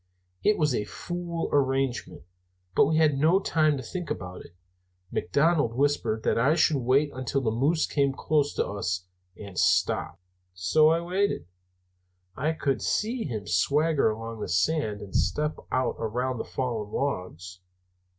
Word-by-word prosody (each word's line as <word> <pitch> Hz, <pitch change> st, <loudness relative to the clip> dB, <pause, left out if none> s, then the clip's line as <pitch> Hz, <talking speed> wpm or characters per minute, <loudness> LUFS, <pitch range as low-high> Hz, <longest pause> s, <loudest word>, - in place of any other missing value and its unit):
It 210 Hz, -, +3 dB
was 150 Hz, -4 st, +2 dB
a 105 Hz, -, 0 dB
fool 175 Hz, -1 st, -4 dB
arrangement, 135 Hz, -, 0 dB, 0.5 s
but -, -, +6 dB
we 155 Hz, +1 st, +1 dB
had 150 Hz, -4 st, +3 dB
no 165 Hz, +6 st, +4 dB
time 155 Hz, -6 st, +2 dB
to 130 Hz, -, -6 dB
think 175 Hz, +10 st, -5 dB
about 90 Hz, -1 st, -5 dB
it. 85 Hz, -, -17 dB, 0.6 s
McDonald 140 Hz, -, +1 dB
whispered 135 Hz, -5 st, 0 dB
that -, -, +1 dB
I 140 Hz, +7 st, +3 dB
should 155 Hz, -2 st, +3 dB
wait 135 Hz, +4 st, +2 dB
until 130 Hz, +1 st, -2 dB
the 115 Hz, -4 st, 0 dB
moose 145 Hz, +8 st, +2 dB
came 140 Hz, -2 st, +1 dB
close 145 Hz, +1 st, 0 dB
to -, -, +1 dB
us 90 Hz, -3 st, -3 dB, 0.3 s
and 100 Hz, -3 st, -6 dB
stopped. -, -, +1 dB, 0.4 s
"So 95 Hz, -, +4 dB
I 165 Hz, +1 st, +2 dB
waited. 185 Hz, -, -1 dB, 0.9 s
I 155 Hz, +4 st, 0 dB
could 140 Hz, -4 st, -1 dB
see 230 Hz, +3 st, -1 dB
him 110 Hz, -7 st, -4 dB
swagger 145 Hz, -, +2 dB
along 115 Hz, +1 st, -5 dB
the -, -, -4 dB
sand 105 Hz, -, 0 dB
and 100 Hz, -2 st, -9 dB
step 150 Hz, +1 st, 0 dB
out 130 Hz, -, 0 dB
around 125 Hz, +3 st, -2 dB
the -, -, -3 dB
fallen 115 Hz, -5 st, -3 dB
logs. 90 Hz, -, -4 dB
135 Hz, 155 wpm, -27 LUFS, 110-155 Hz, 0.9 s, but